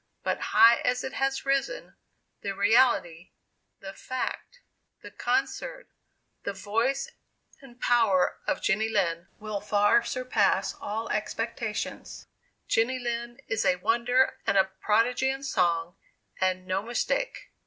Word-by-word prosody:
But - - -1
high 230 +1 +6
as 250 0 0
it 265 - -5
has 270 0 -1
risen, 275 - -1 0.5
the 200 - -3
reality 200 -5 +2 0.5
the 195 0 -8
fact 260 - -5 0.4
the - - -10
concert - - -2 0.5
the 200 - -3
voice 225 +8 -1 0.5
and 250 -3 -16
power 225 -8 +2
of - - -1
Jenny 215 +2 +1
Lind 175 -5 0
will 210 -2 -5
far 205 +3 +3
surpass 215 -7 +1
all 220 +2 -3
past - - -1
expectation. - - -4 0.6
Jenny 240 +3 +2
Lind 240 0 -4
is 220 - 0
a 180 - +3
wonder, 240 +7 +1
and 200 -1 +3
a 190 - +7 0.2
prodigy 240 +5 +2
in 270 +1 -3
song 170 -8 0 0.4
and 185 -1 0
no 185 +1 -1
mistake." 375 - -2
225 Hz, 130 wpm, -27 LUFS, 195-255 Hz, 0.6 s, a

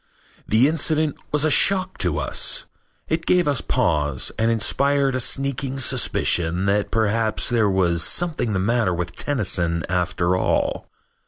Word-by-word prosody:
The 115 +5 +4
incident 155 -1 0 0.2
was 150 0 +1
a 155 - +1
shock 185 +3 +2
to 90 -6 0
us. 75 - -1 0.4
It 165 +1 -2
gave 180 -3 +3
us 140 -4 +1
pause 75 - 0
and 115 +1 +2
inspired 140 +4 +1
a 130 - -1
sneaking 135 +1 -1
suspicion 90 -7 0
that 100 +1 0
perhaps 110 0 0
there 115 -4 +2
was 90 -3 +1
something 155 - 0
the 95 - 0
matter 105 -2 0
with 85 -1 -5
Tennyson 90 - 0
after 90 0 0
all. 90 - -1
115 Hz, 145 wpm, -22 LUFS, 90-140 Hz, 0.4 s, The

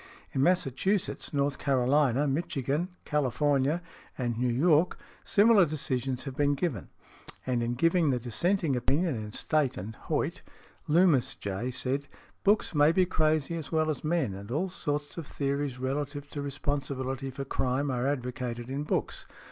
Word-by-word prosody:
In 135 - 0
Massachusetts, 180 +4 +1
North 140 -1 0
Carolina, 135 0 +2
Michigan, 145 +1 -1 0.2
California 145 +2 +1 0.3
and 120 -3 -1
New 125 +2 0
York, 155 +6 +3 0.3
similar 210 -1 +5
decisions 135 -5 -2
have 135 -3 -6
been 145 0 +2
given; 130 - -2 0.6
and 125 -2 0
in 120 +1 -1
giving 165 +3 +3
the 125 -2 +1
dissenting 155 - 0
opinion 145 +7 +1
in 105 -3 -5
State 145 +1 0
and 105 +5 -6
Hoyt, - - -1 0.5
Loomis, 160 -4 +4
J., 100 +5 -3
said, 135 +3 -1 0.4
"Books 205 -1 +3
may 145 0 +5
be 185 +2 +3
crazy 155 -3 +1
as 160 -4 -6
well 155 -1 +2
as 150 - -6
men, 155 - 0
and 100 +2 -9
all 160 +10 -1
sorts 145 -3 -3
of 155 - -7
theories 140 -2 -2
relative 140 +2 -3
to 145 - -4
responsibility 135 -2 -3
for 135 +1 -5
crime 135 +1 0
are 125 +1 0
advocated 125 -2 -3
in 140 +2 -2
books. 150 - -2
140 Hz, 150 wpm, -29 LUFS, 130-155 Hz, 0.6 s, similar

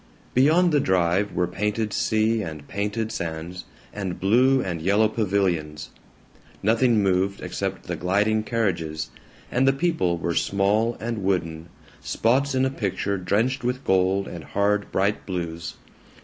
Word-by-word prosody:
Beyond 160 +7 +4
the 150 - +3
drive 95 -1 +1
were 90 - 0
painted 105 +4 -2
sea 110 +1 +1
and 80 -6 -7
painted 105 +2 -2
sands, 85 -1 -5 0.3
and 95 -4 -4
blue 125 +7 +4
and 85 -8 -3
yellow 100 +5 +3
pavilions. 95 -8 -1 0.7
Nothing 115 0 +3
moved 95 +1 +1
except - - -4
the - - -4
gliding 105 +4 +1
carriages, 90 -9 -2 0.4
and 130 +2 +2
the 135 - +5
people 140 - 0
were 85 +1 -2
small 105 +6 +1
and 115 -2 -3
wooden, 85 -3 -1 0.3
spots 135 +4 +1
in 130 0 +3
a 130 - 0
picture 100 -4 -2
drenched 115 +9 0
with 125 +2 -2
gold 95 +1 +2
and 85 -2 -7
hard 100 +6 0
bright 100 +2 0
blues. 85 -3 -4
100 Hz, 140 wpm, -24 LUFS, 90-115 Hz, 0.7 s, the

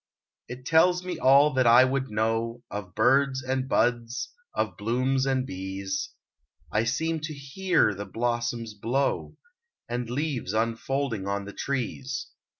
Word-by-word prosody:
It 125 +1 -9
tells 180 +3 +4
me 180 - -4
all 140 +3 +6
that 130 -2 +3
I 120 +2 +8
would 135 0 -1
know, 115 +2 -1
Of 100 -4 -6
birds 135 0 +3
and 130 0 -2
buds, 120 -1 0 0.2
of - - -1
blooms 130 +5 0
and 130 -1 +1
bees; 95 -1 -4 0.6
I 110 +2 +1
seem 160 +6 0
to 155 0 -5
hear 140 - +1
the 100 +1 -6
blossoms 120 0 -2
blow, 120 +7 -1 0.5
And 120 0 -3
leaves 130 -6 -2
unfolding 115 0 -1
on 100 0 -2
the 100 - -8
trees. 135 0 -3
125 Hz, 140 wpm, -27 LUFS, 115-135 Hz, 0.6 s, I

